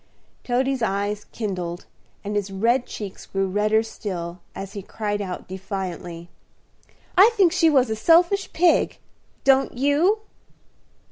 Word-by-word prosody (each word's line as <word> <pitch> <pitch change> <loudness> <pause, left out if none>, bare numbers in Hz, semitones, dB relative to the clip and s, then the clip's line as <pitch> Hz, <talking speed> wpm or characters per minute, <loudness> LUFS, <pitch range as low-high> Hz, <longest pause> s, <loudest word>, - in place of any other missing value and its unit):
Toady's 260 +1 0
eyes 205 -1 -1
kindled, 180 -5 -5 0.4
and 205 +1 -4
his 205 -1 -1
red 235 +6 +1
cheeks 205 -3 -8
grew 195 0 -1
redder 210 +3 +2
still, 180 -6 -6 0.2
as 195 0 -7
he 200 - -5
cried 205 +1 -3
out 185 -3 -5
defiantly, 180 -3 -6 0.9
"I 390 +4 +8
think 380 -6 +5
she 335 -2 +4
was 260 -6 +3
a - - 0
selfish 345 - +3
pig, 345 0 +3 0.5
don't 270 -2 +3
you?" 305 - +2
215 Hz, 130 wpm, -23 LUFS, 195-270 Hz, 0.9 s, I